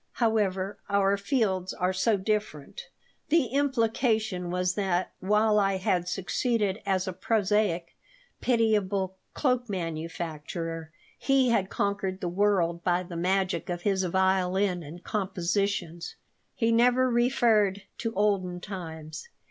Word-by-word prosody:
However, 205 -4 0
our 200 0 +3
fields 200 -4 -1
are 180 +1 0
so 205 +3 +2
different." 200 -7 -3 0.4
The 315 -6 +3
implication 225 -8 0
was 180 0 0
that, 185 -3 0
while 210 +2 +3
I 195 -1 +2
had 180 -1 0
succeeded 205 +2 0
as 190 -1 +1
a 185 - -2
prosaic, 200 -3 0 0.4
pitiable 205 -5 +1 0.2
cloak 250 -4 0
manufacturer, 165 -2 -4 0.3
he 270 -2 +3
had 200 -5 +1
conquered 200 -2 -1
the 180 - -2
world 175 -3 +1
by 180 0 +1
the 175 -1 -9
magic 185 0 0
of 175 0 -3
his 195 -2 +1
violin 190 0 +1
and 165 +3 -10
compositions. 185 -3 -2 0.4
He 230 -1 +1
never 245 +2 +4
referred 235 -5 +2 0.2
to 230 - -2
olden 190 -3 +1
times. 165 - -7
195 Hz, 120 wpm, -28 LUFS, 180-215 Hz, 0.4 s, never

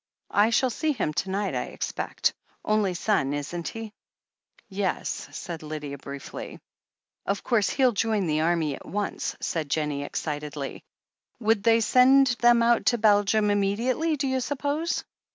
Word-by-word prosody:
"I 210 +2 +5
shall 250 +2 +2
see 310 +6 0
him 190 - -2
to 170 +6 -2
night, 200 +1 -1
I - - -1
expect. - - -2 0.3
Only 210 -4 +1
son, 170 -8 +1
isn't 165 +4 -4
he?" 225 -2 -6 0.7
"Yes," 195 -1 -2
said 170 -3 -6
Lydia 150 -2 -6
briefly. 140 0 -8 0.7
"Of 200 0 -1
course, 220 -5 +2
he'll 260 -3 +3
join 215 -2 0
the 155 -1 +1
army 160 -3 +1
at - - -9
once," 205 0 -3
said 155 -4 -2
Jennie 150 -1 -1
excitedly. 145 -1 -5 0.6
"Would 220 -2 +2
they 230 +1 +4
send 255 +2 +5
them 240 0 +5
out 235 0 +3
to 240 - +4
Belgium 210 0 +3
immediately, 235 +11 +1
do 275 0 -1
you 260 0 0
suppose?" 290 +5 -2
205 Hz, 150 wpm, -26 LUFS, 160-240 Hz, 0.7 s, I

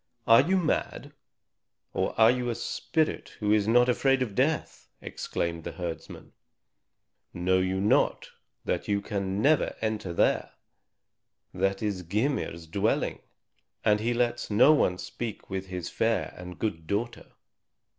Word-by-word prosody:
"Are 115 0 +7
you 190 +3 +1
mad, 175 -4 -1 0.8
or - - -2
are 110 +1 +7
you 125 -1 -2
a 120 - -1
spirit 160 +6 -2
who 105 -1 0
is 105 -1 +3
not 120 +2 +5
afraid 135 +1 +2
of 110 -5 -6
death!" 145 +8 -1
exclaimed 85 -1 -4
the - - -6
herdsman. 85 -3 -7 1.0
"Know 90 +1 +2
you 95 +1 0
not 105 +2 +1 0.3
that - - -2
you 100 -1 +1
can 100 -1 -3
never 150 +2 +3
enter 110 -4 -2
there? 85 - +1 1.0
That 95 +2 0
is 100 -3 -1
Gymir's 100 - -2
dwelling, 100 +7 0 0.7
and 105 0 +4
he 120 +2 0
lets 120 0 0
no 120 +8 +6
one 90 -11 +2
speak 100 +4 -6
with 95 0 -3
his 90 -2 -5
fair - - 0
and 90 0 -9
good 80 -8 -3
daughter." 115 +5 -3
105 Hz, 140 wpm, -28 LUFS, 95-120 Hz, 1.0 s, Are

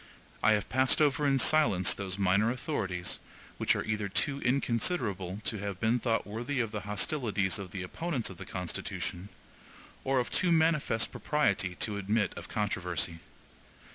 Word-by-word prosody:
I 110 - +5
have 105 -2 0
passed 130 0 +3
over 145 -1 +3
in 135 -1 +3
silence 130 - +4
those 95 -2 -4
minor 100 +3 +3
authorities, 95 - -2 0.4
which - - +3
are - - -1
either 105 -2 -1
too 140 +7 0
inconsiderable 115 - 0
to 100 +2 -1
have 100 -2 -4
been 115 +3 +2
thought 115 -2 0
worthy 120 +6 -3
of 115 -3 0
the 105 - -3
hostilities 105 - 0
of 95 -2 -6
the 95 +1 -5
opponents 135 - -3
of 90 - -11
the - - -8
Constitution, 90 +1 -4 0.7
or 135 0 +1
of 125 - 0
too 180 - +2
manifest 160 -8 +2
propriety 100 -11 0
to 105 +2 -1
admit 100 +1 0
of - - -8
controversy. 90 -5 -2
110 Hz, 160 wpm, -30 LUFS, 95-130 Hz, 0.7 s, I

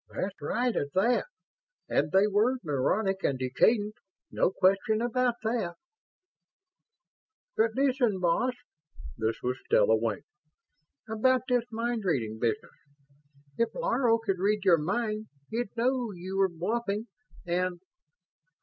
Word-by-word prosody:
"That's 195 -3 -4
right, 240 +10 0
at 140 0 -2
that. 235 +6 +2 0.6
And - - +1
they 190 +2 +5
were 210 +5 +2
neurotic 190 +7 0
and 135 - +1
decadent. 205 - +2 0.4
No - - +2
question 195 +3 +2
about 245 +1 +1
that." 220 -6 -1 1.8
"But 220 0 +2
listen, 255 -7 +2
boss." 210 +9 +1 0.6
This 110 0 -1
was 125 +1 -1
Stella 110 +1 +4
Wing. 110 -2 -2 0.8
"About 250 +4 +2
this 245 -2 +2
mind 230 +1 -2
reading 115 - -1
business. 115 -1 -1 0.9
If 230 - +1
Laro 275 - +2
could 200 -5 -2
read 205 +1 +1
your 175 -4 +6
mind, 215 +5 -2 0.2
he'd 235 0 -2
know 245 -1 +1
you 185 +2 -6
were 195 0 +3
bluffing 205 +5 -2 0.4
and 180 0 -1
205 Hz, 120 wpm, -29 LUFS, 175-235 Hz, 1.8 s, your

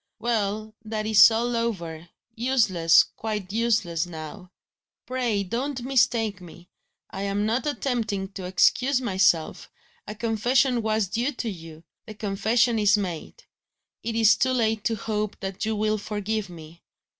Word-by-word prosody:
Well! 215 -2 -2
that 215 -1 -4
is 215 0 +8
all 235 +2 -1
over 170 -8 -3 0.2
useless, 210 -9 +4
quite 210 -3 -4
useless 210 -8 0
now. 175 +3 -9 0.5
Pray 245 -6 -1
don't 250 +6 -3
mistake 235 -6 +1
me. 175 0 -14 0.4
I 195 - -6
am 200 +1 -1
not 235 +7 -1
attempting 225 -9 -2
to 195 -2 -8
excuse 250 +8 +2
myself; 185 -8 +1 0.4
a 210 - -6
confession 235 +3 +1
was 220 -1 0
due 235 +9 -1
to 245 -2 -4
you; 165 -3 -11 0.2
the 215 - -9
confession 220 +3 +1
is 205 0 +4
made. 190 - -5 0.6
It 230 0 -4
is 220 -2 +5
too 260 0 +1
late 220 -3 0
to 225 - +1
hope 210 -1 -3
that 195 +1 -4
you 220 0 -1
will 215 0 0
forgive 210 0 -3
me. 165 -1 -12
215 Hz, 145 wpm, -25 LUFS, 190-235 Hz, 0.6 s, is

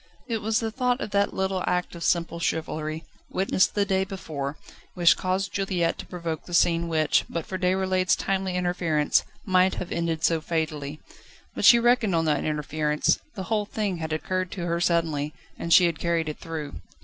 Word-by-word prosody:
It 230 -3 -1
was 220 +1 +1
the 225 -1 -2
thought 250 +1 0
of 215 - -5
that 200 0 +2
little 190 -1 -1
act 180 0 0
of 170 -1 -7
simple 170 -1 0
chivalry, 155 -1 -2 0.3
witnessed 190 0 +1
the 205 -1 +2
day 190 -1 +1
before, 155 -7 -5 0.4
which 175 -2 +5
caused 190 +1 -2
Juliette 185 -4 0
to - - -7
provoke 170 -3 -5
the 175 - -3
scene 170 0 +3
which, 155 -2 +2
but 170 -2 -3
for 185 - -5
Déroulède's 185 0 +2
timely 190 -1 -1
interference, 175 -4 +1 0.2
might 185 -1 +3
have 180 - -5
ended 165 -2 -1
so 165 -1 +2
fatally. 155 -3 -3 0.5
But - - -1
she 240 - +9
reckoned 235 -5 +3
on 165 0 +1
that 150 -2 +1
interference: 150 0 0 0.2
the 190 - -4
whole 210 +1 0
thing 205 -4 -2
had 160 -1 -4
occurred 185 +3 -2
to 175 -3 -4
her 170 0 -1
suddenly, 160 -4 0 0.2
and 170 - -4
she 175 - +8
had 165 -3 -1
carried 170 -2 0
it 150 - -7
through. 155 -3 -6
175 Hz, 185 wpm, -26 LUFS, 160-190 Hz, 0.5 s, she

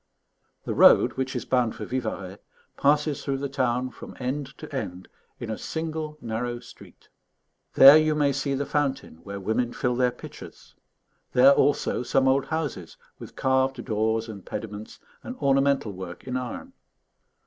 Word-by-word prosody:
The - - -2
road, - - +6
which 130 0 -3
is 120 - -3
bound 125 -3 +1
for - - -6
Vivarais, 105 -6 -4 0.4
passes 150 0 +1
through 135 -1 -1
the 140 +1 -3
town 130 -2 -1
from - - -11
end 135 +2 -4
to 155 -2 -9
end 90 -8 -5 0.3
in 115 - -5
a 110 - -5
single 160 -1 -4
narrow 120 +1 -3
street; - - -16 0.7
there 135 +3 +10
you 155 0 +2
may 145 -2 +2
see 140 0 -1
the 140 +1 -2
fountain 140 - -2
where 100 +4 -8
women 115 +5 -1
fill 125 -1 -1
their 125 0 +2
pitchers; - - -12 0.6
there 130 +2 +7
also 140 -1 +2
some 130 +2 +1
old 135 +1 +3
houses 145 - -4 0.2
with - - -11
carved 130 -1 0
doors 110 0 0
and 100 -4 -9
pediments 105 -1 -7 0.2
and 250 - -7
ornamental 135 - +1
work 90 -2 -8
in 130 -1 -5
iron. 130 - -5
130 Hz, 160 wpm, -25 LUFS, 115-140 Hz, 0.7 s, there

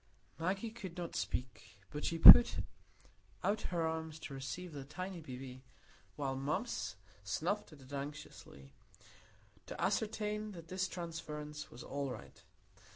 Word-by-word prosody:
Maggie 195 +6 -1
could 195 -7 -8
not 175 -2 -5
speak, 110 +3 -4
but 150 +1 -5
she 165 - -1
put 235 +8 +12 0.9
out 210 +2 +1
her 170 -2 0
arms 160 -1 -3
to 155 - -8
receive 155 +6 -6
the 140 -2 -6
tiny 185 +5 -6
baby, 130 -2 -8 0.5
while 135 -2 -2
Mumps 135 - -2 0.3
snuffed 165 - -2
at 150 -3 -14
it 130 +2 -13
anxiously, 140 - -8 0.9
to - - -7
ascertain 210 -1 -1
that 165 -2 -11
this 185 0 -1
transference 150 -3 -6
was 120 - -10
all 140 -1 -3
right. 120 -5 -10
155 Hz, 135 wpm, -35 LUFS, 135-185 Hz, 0.9 s, put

